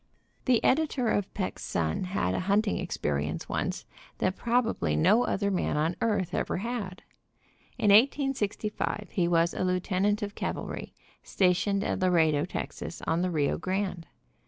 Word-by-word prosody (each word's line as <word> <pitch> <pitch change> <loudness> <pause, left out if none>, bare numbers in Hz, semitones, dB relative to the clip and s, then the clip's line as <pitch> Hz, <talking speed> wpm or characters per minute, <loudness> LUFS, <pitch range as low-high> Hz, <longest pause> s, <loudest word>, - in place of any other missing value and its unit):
The 250 -3 +3
editor 270 -4 +2
of 205 -2 0
Peck's 190 -3 -3
Sun 80 - -1
had 180 - -1
a - - 0
hunting 205 +1 +2
experience 75 +1 -2
once - - -2 0.3
that 185 - 0
probably 230 - 0
no 220 - +4
other 200 0 0
man 180 -5 0
on 160 +3 +1
earth 200 -6 0
ever - - -1
had. 205 -3 -4 0.7
In 205 - +3
1865 215 -4 +1
he 180 -5 +1
was 170 0 +2
a - - -2
lieutenant 185 +3 +1
of 205 0 -4
cavalry, - - -5 0.3
stationed 195 +2 +1
at - - -1
Laredo, 160 -5 +3
Tex., 180 - -5
on 165 +2 +1
the 185 - +1
Rio 150 -5 0
Grande. 185 -2 -2
190 Hz, 145 wpm, -28 LUFS, 170-210 Hz, 0.7 s, no